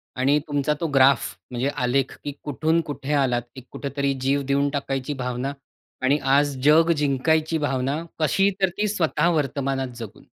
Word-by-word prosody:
आणि 135 +3 +3
तुमचा 145 0 0
तो 165 - -1
ग्राफ 135 -1 +4 0.2
म्हणजे 125 +2 -1
आलेख, 130 0 0
की 145 - -3
कुठून 155 +3 +1
कुठे 145 0 -3
आलात. 130 -4 +2 0.3
कुठेतरी 140 0 -2
जीव 140 +2 +1
देऊन 140 +1 +2
टाकायची 140 0 -3
भावना 125 +2 -3 0.5
आणि 140 +3 +3 0.2
आज 145 0 +3
जग 160 +3 +6
जिंकायची 155 +3 +1
भावना. 140 0 -1 0.2
कशी? 195 +5 +3
तर 190 - +4
ती 210 +1 +1
स्वतः 170 -5 +1
वर्तमानात 135 -2 -1
जगून. 115 -4 -9
140 Hz, 150 wpm, -23 LUFS, 135-150 Hz, 0.5 s, जग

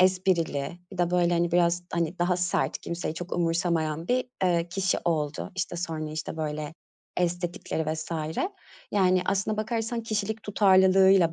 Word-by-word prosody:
esprili, 180 -4 +1
bir 185 - -9
de 175 -1 +2
böyle, 175 -1 +3
hani, 170 0 +1
biraz, 175 0 +3
hani, 170 +1 -1
daha 175 +1 +2
sert, 180 -1 0
kimseyi 170 -2 -4
çok 175 +2 -7
umursamayan 165 -2 0
bir, 250 +1 +2 0.2
eee, 175 -1 +2
kişi 190 +1 0
oldu. 150 -3 -1
İşte, 180 -1 -2
sonra, 160 -3 -3
işte, 155 +1 -5
böyle, 150 -1 -3 0.4
estetikleri 175 -3 -1
vs. 160 +1 -6 0.8
Yani 185 -2 +3
aslına 200 +2 0
bakarsan 225 +1 -2
kişilik 220 0 -2
tutarlılığıyla 190 -3 +5
175 Hz, 145 wpm, -27 LUFS, 165-190 Hz, 0.8 s, tutarlılığıyla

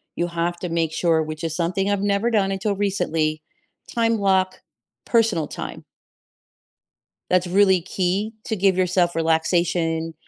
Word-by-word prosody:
you 170 - 0
have 170 0 -2
to 180 - -4
make 165 -1 0
sure, 165 -1 +2
which 155 +1 -6
is 160 -1 -2
something 180 +3 -1
I've 200 -1 0
never 205 +3 +1
done 200 -3 +2
until 195 +1 -1
recently, 165 -6 -1 0.5
time 230 -1 +1
block, 190 -2 +1 0.4
personal 220 -10 +2
time. - - -7 1.5
That's 180 0 +3
really 190 0 +4
key 185 +4 -2
to 220 - -3
give 195 0 +3
yourself 180 -2 +1
relaxation 165 0 0
180 Hz, 140 wpm, -22 LUFS, 165-200 Hz, 1.5 s, really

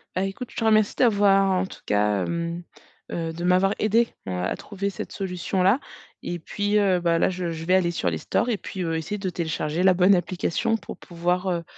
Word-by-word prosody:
Ben, 185 - +1
écoute, 195 +6 -6
je - - -16
te - - -1
remercie 215 -2 +4
d'avoir 200 -4 +4
en 185 0 +1
tout - - -11
cas, 105 -2 +2
hem, 170 +1 -3 0.5
heu, 165 -1 -3
de 170 - -6
m'avoir 185 +3 +3
aidé, 225 +2 +3 0.2
heu, 95 - -3
à 90 0 -1
trouver 200 -1 -4
cette - - -7
solution-là 190 +3 0 0.4
et 175 - -4
puis, 205 +5 -1
heu, 195 -3 +3
bah, 170 -1 +2
là, - - +3
je 180 -2 -3
je 165 0 -6
vais 185 - +2
aller 185 -2 +3
sur 95 - -1
les 80 - -3
stores 245 - 0
et 220 - +1
puis, 190 -2 -6
heu, 165 -1 -1
essayer 160 +6 -3
de 195 -2 -3
télécharger 160 -1 -2
la 185 -1 +5
bonne 185 +2 +5
application 185 +5 0
pour - - -9
pouvoir, 180 +2 -2
heu, 170 -1 -1
185 Hz, 220 wpm, -24 LUFS, 170-200 Hz, 0.5 s, la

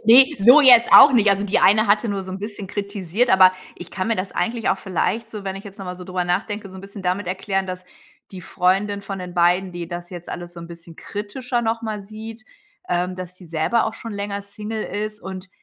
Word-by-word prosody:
Ne, 250 +4 +8
so 245 +9 +7
jetzt 245 -4 +7
auch 275 0 +10
nicht. 215 -4 +4
Also, 200 +1 +1
die 200 - +1
eine 215 +2 +4
hatte 210 +3 +2
nur 200 -1 -2
so 185 - -7
'n 190 - -5
bisschen 205 -1 -7
kritisiert, 200 +2 -2
aber 185 -1 +7 0.2
ich 175 -1 -10
kann 185 +4 -3
mir 230 - +1
das 185 +1 -4
eigentlich 230 -1 -2
auch - - +1
vielleicht 220 +4 -2
so, 210 -2 -8
wenn 190 0 -4
ich 195 - -10
jetzt 200 0 -12
noch 195 - -7
mal 180 - -5
so 180 - -10
drüber 180 -1 -3
nachdenke, 205 +3 -2
so 190 - -14
'n - - -9
bisschen 195 0 -10
damit 180 +1 -2
erklären, 190 +1 -2
dass 185 0 -7 0.5
die 185 - -8
Freundin 195 +3 0
von 195 -1 -6
den 180 -1 -8
beiden, 180 +2 +2
die 175 -1 -6
das 175 0 -7
jetzt 175 -1 -9
alles 175 0 -7
so 170 - -9
'n 170 - -9
bisschen 170 -1 -13
kritischer 240 +4 -4
nochmal 225 -2 -3
sieht, 220 +2 -10 0.4
ähm, 180 +1 -1
dass 180 0 -9
sie 180 - -14
selber 165 +9 0
auch 220 - -4
schon 230 -1 -8
länger 200 0 -4
Single 210 +2 -6
ist 215 +1 -5
und 190 0 -8
200 Hz, 240 wpm, -21 LUFS, 185-215 Hz, 0.5 s, auch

